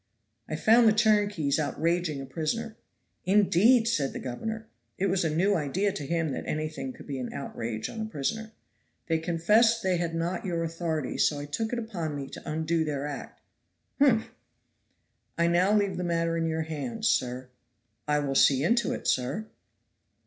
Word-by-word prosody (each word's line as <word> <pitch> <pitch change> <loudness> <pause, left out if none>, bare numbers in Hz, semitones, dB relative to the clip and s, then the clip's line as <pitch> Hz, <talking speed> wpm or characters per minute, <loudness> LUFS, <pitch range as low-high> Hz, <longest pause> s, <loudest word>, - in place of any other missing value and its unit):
"I 155 - -2
found 225 +8 +5
the 215 - +6
turnkeys 205 -9 +2
outraging 160 0 0
a - - -6
prisoner." 220 - -3 0.5
"Indeed!" 210 +4 +4
said 145 -12 0
the - - -5
governor. 220 - -5 0.3
It 195 - 0
was 190 -1 +1
a 160 - +1
new 180 +7 +2
idea 180 +5 0
to 145 -9 -5
him 165 -1 0
that - - -4
anything 155 +12 -3
could 240 - -13
be 140 -2 -4
an 125 - -4
outrage 115 -5 -4
on 225 - -6
a - - -2
prisoner. 220 +5 -3 0.5
"They 165 -2 +1
confessed 210 +8 +3
they 185 -1 +2
had 170 -1 -2
not 175 +7 -2
your 170 -4 -1
authority, 165 -3 -3
so 150 - +3
I 145 - -5
took 220 +10 -3
upon 200 -11 -3
me 140 -1 -4
to - - -9
undo 160 +1 0
their 145 -2 -3
act." 145 -2 -7 0.6
"Humph!" 250 -6 +3 1.1
"I 170 - +3
now 175 +3 +3
leave 200 -3 +2
the 180 - -2
matter 165 -1 0
in 165 0 0
your 160 0 -1
hands, 215 +9 -3
sir." 125 - 0 0.6
"I 150 0 +2
will 140 -1 -1
see 135 0 +4
into 235 +5 +2
it, - - -5
sir." 130 - 0
170 Hz, 175 wpm, -28 LUFS, 150-215 Hz, 1.1 s, the